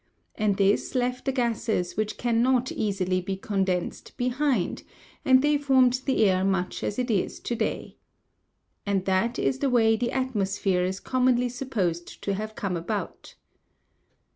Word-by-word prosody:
And 205 Hz, -2 st, 0 dB
this 200 Hz, +6 st, +1 dB
left 250 Hz, 0 st, -1 dB
the 270 Hz, -, +1 dB
gases 230 Hz, -7 st, -1 dB
which 215 Hz, 0 st, -2 dB
cannot 245 Hz, +1 st, +2 dB
easily 190 Hz, -3 st, -1 dB
be 190 Hz, +2 st, -3 dB
condensed 190 Hz, -3 st, -2 dB
behind, 250 Hz, -5 st, 0 dB, 0.4 s
and 260 Hz, 0 st, +5 dB
they 295 Hz, 0 st, +3 dB
formed 260 Hz, -3 st, +3 dB
the 260 Hz, -5 st, +3 dB
air 185 Hz, -1 st, +2 dB
much 190 Hz, -2 st, -1 dB
as 205 Hz, -, -2 dB
it 250 Hz, -1 st, -1 dB
is 200 Hz, -4 st, -1 dB
to 240 Hz, -, -2 dB
day. -, -, -3 dB, 0.9 s
And 195 Hz, -2 st, -1 dB
that 195 Hz, +6 st, +1 dB
is 265 Hz, -, 0 dB
the 275 Hz, -, +1 dB
way 225 Hz, -3 st, +4 dB
the 240 Hz, +2 st, -1 dB
atmosphere 200 Hz, -7 st, 0 dB
is 185 Hz, +2 st, -2 dB
commonly 250 Hz, +1 st, +1 dB
supposed 210 Hz, -10 st, -3 dB
to 200 Hz, -, 0 dB
have 215 Hz, +2 st, -5 dB
come 195 Hz, -3 st, -2 dB
about. 200 Hz, +5 st, -5 dB
220 Hz, 150 wpm, -26 LUFS, 195-250 Hz, 0.9 s, and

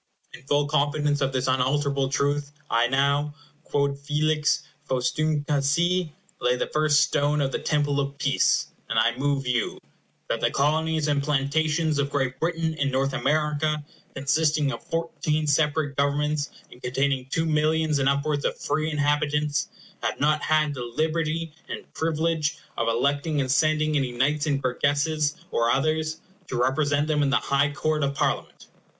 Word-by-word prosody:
In -, -, -11 dB
full 145 Hz, 0 st, +2 dB
confidence 145 Hz, 0 st, +1 dB
of 135 Hz, 0 st, +1 dB
this 130 Hz, -1 st, -1 dB
unalterable 135 Hz, +1 st, +1 dB
truth, 145 Hz, +1 st, 0 dB, 0.2 s
I 115 Hz, +1 st, +3 dB
now, 140 Hz, +3 st, +1 dB, 0.3 s
quod 140 Hz, -1 st, 0 dB
felix 150 Hz, +1 st, +1 dB, 0.3 s
faustumque 145 Hz, +4 st, 0 dB, 0.2 s
sit, 170 Hz, +6 st, +2 dB, 0.3 s
lay 125 Hz, 0 st, +2 dB
the -, -, -1 dB
first 155 Hz, -1 st, +4 dB
stone 145 Hz, 0 st, +1 dB
of 135 Hz, -2 st, 0 dB
the -, -, -2 dB
Temple 145 Hz, -2 st, 0 dB
of 140 Hz, 0 st, -3 dB
Peace; 140 Hz, -1 st, +2 dB, 0.2 s
and 115 Hz, -, -1 dB
I 115 Hz, +1 st, +3 dB
move 140 Hz, 0 st, 0 dB
you 125 Hz, -3 st, 0 dB, 0.5 s
"That -, -, -2 dB
the -, -, +3 dB
Colonies 155 Hz, +2 st, +1 dB
and 145 Hz, -1 st, +1 dB
Plantations 150 Hz, +2 st, +1 dB
of 140 Hz, 0 st, 0 dB
Great 135 Hz, -3 st, -1 dB
Britain 165 Hz, -1 st, -1 dB
in 145 Hz, -3 st, -1 dB
North 135 Hz, +1 st, 0 dB
America, 150 Hz, +2 st, 0 dB, 0.3 s
consisting 150 Hz, +1 st, +1 dB
of -, -, -6 dB
fourteen 165 Hz, -2 st, -2 dB
separate 150 Hz, -1 st, +1 dB
governments, 145 Hz, +1 st, 0 dB, 0.2 s
and 125 Hz, -, -15 dB
containing 135 Hz, +1 st, 0 dB
two 165 Hz, +4 st, 0 dB
millions 155 Hz, -1 st, +1 dB
and 135 Hz, 0 st, +3 dB
upwards 140 Hz, +1 st, 0 dB
of -, -, -1 dB
free 155 Hz, 0 st, -1 dB
inhabitants, 150 Hz, 0 st, 0 dB, 0.3 s
have -, -, -2 dB
not 150 Hz, +1 st, +2 dB
had 155 Hz, -1 st, +2 dB
the 130 Hz, -, -6 dB
liberty 155 Hz, +5 st, -1 dB, 0.2 s
and -, -, -7 dB
privilege 160 Hz, -1 st, 0 dB, 0.2 s
of 115 Hz, -, -1 dB
electing 140 Hz, +6 st, +1 dB
and 130 Hz, -2 st, 0 dB
sending 155 Hz, +1 st, +2 dB
any 135 Hz, -3 st, 0 dB
Knights 145 Hz, +5 st, 0 dB
and 140 Hz, -2 st, 0 dB
Burgesses, 145 Hz, +4 st, +1 dB, 0.2 s
or 115 Hz, 0 st, +1 dB
others, 155 Hz, +4 st, 0 dB, 0.3 s
to 125 Hz, -, -3 dB
represent 145 Hz, +3 st, +2 dB
them 150 Hz, -1 st, +1 dB
in 140 Hz, -, +2 dB
the 135 Hz, -, +3 dB
High 140 Hz, +1 st, +1 dB
Court 155 Hz, 0 st, -1 dB
of 140 Hz, 0 st, -1 dB
Parliament." -, -, -2 dB
145 Hz, 160 wpm, -25 LUFS, 140-155 Hz, 0.5 s, first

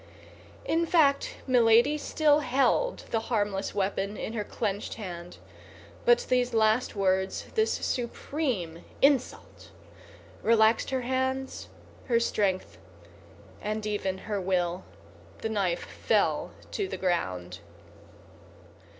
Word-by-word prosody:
In 335 Hz, +1 st, +1 dB
fact, 290 Hz, -5 st, +3 dB
Milady 240 Hz, +2 st, +5 dB
still 300 Hz, 0 st, +2 dB
held 275 Hz, -, +1 dB
the 225 Hz, -, +2 dB
harmless 205 Hz, -4 st, -1 dB
weapon 200 Hz, +1 st, -1 dB
in 220 Hz, -, -4 dB
her 215 Hz, -2 st, -2 dB
clenched 205 Hz, -1 st, -3 dB
hand; 175 Hz, -5 st, -8 dB, 0.7 s
but 485 Hz, -1 st, +4 dB
these 250 Hz, -1 st, +1 dB
last 220 Hz, +2 st, +2 dB
words, 190 Hz, -1 st, 0 dB
this 440 Hz, -1 st, +2 dB
supreme 240 Hz, -, -3 dB, 0.2 s
insult, 275 Hz, -2 st, +1 dB, 0.7 s
relaxed 225 Hz, 0 st, +4 dB
her 260 Hz, -1 st, -1 dB
hands, 260 Hz, +1 st, -2 dB, 0.4 s
her 235 Hz, -3 st, +3 dB
strength, 200 Hz, -5 st, -1 dB, 0.8 s
and 215 Hz, 0 st, -3 dB
even 205 Hz, -3 st, -2 dB
her 205 Hz, -3 st, -2 dB
will. 180 Hz, -1 st, -1 dB, 0.6 s
The 225 Hz, -, -1 dB
knife 195 Hz, -5 st, 0 dB
fell -, -, 0 dB, 0.2 s
to 405 Hz, -, -2 dB
the -, -, -5 dB
ground. 95 Hz, -, -2 dB
220 Hz, 105 wpm, -28 LUFS, 190-260 Hz, 0.8 s, Milady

